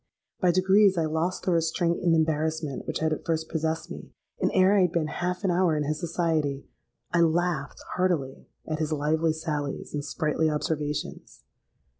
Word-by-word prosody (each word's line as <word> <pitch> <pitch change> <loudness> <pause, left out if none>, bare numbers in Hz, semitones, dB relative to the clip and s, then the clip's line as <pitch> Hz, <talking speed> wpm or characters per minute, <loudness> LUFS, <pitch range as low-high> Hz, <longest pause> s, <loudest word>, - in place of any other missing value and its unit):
By 180 - +3
degrees 190 +2 +4
I 165 - +2
lost 160 +4 -1
the 185 - +1
restraint 170 +1 +1
and 170 -2 +3
embarrassment 155 -2 -1
which - - -2
had 160 0 +2
at - - -5
first 160 -1 -2
possessed 160 +1 -2
me; - - -8 0.3
and - - +2
ere 190 +2 +4
I 200 - +5
had 180 -2 +3
been 170 -3 0
half 180 +5 -3
an 190 - +2
hour 175 -3 +2
in 150 - 0
his 150 +1 -2
society, 160 -5 -1 0.5
I 170 - +3
laughed 165 -3 0
heartily 170 -8 -1 0.2
at 155 -1 -2
his 155 -1 -1
lively 155 +2 +1
sallies 150 -3 -4
and 145 -1 -2
sprightly 155 +1 0
observations. 150 -1 -3
160 Hz, 175 wpm, -27 LUFS, 155-175 Hz, 0.5 s, I